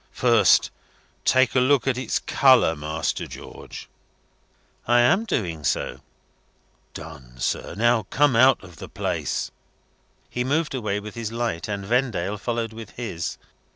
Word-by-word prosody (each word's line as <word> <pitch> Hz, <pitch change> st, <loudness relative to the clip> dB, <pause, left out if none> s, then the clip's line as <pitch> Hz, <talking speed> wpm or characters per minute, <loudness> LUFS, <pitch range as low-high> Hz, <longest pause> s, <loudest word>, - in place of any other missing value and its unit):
First, 115 Hz, -6 st, +4 dB, 0.5 s
take 130 Hz, -3 st, +4 dB
a 130 Hz, -, +4 dB
look 130 Hz, +1 st, +3 dB
at 135 Hz, -2 st, +1 dB
its 130 Hz, +1 st, -1 dB
colour, 130 Hz, -11 st, +4 dB
Master 75 Hz, +1 st, -3 dB
George." -, -, -10 dB, 1.0 s
"I 120 Hz, +1 st, +5 dB
am 195 Hz, -, +3 dB
doing 90 Hz, -, -2 dB
so." 65 Hz, -1 st, -1 dB, 0.9 s
"Done, 70 Hz, -6 st, -10 dB
sir. 60 Hz, -, -2 dB
Now, 115 Hz, -1 st, +2 dB
come 145 Hz, -3 st, +3 dB
out 130 Hz, +1 st, +5 dB
of 90 Hz, -3 st, -13 dB
the -, -, -9 dB
place." -, -, -3 dB, 0.8 s
He 125 Hz, -, -3 dB
moved 150 Hz, +4 st, 0 dB
away 105 Hz, -6 st, -2 dB
with 105 Hz, 0 st, -9 dB
his 115 Hz, -2 st, -5 dB
light, 115 Hz, -7 st, -2 dB
and 100 Hz, -2 st, -4 dB
Vendale 105 Hz, -4 st, 0 dB
followed 115 Hz, 0 st, -3 dB
with 110 Hz, -1 st, -10 dB
his. 95 Hz, -9 st, -4 dB
115 Hz, 140 wpm, -24 LUFS, 95-125 Hz, 1.0 s, I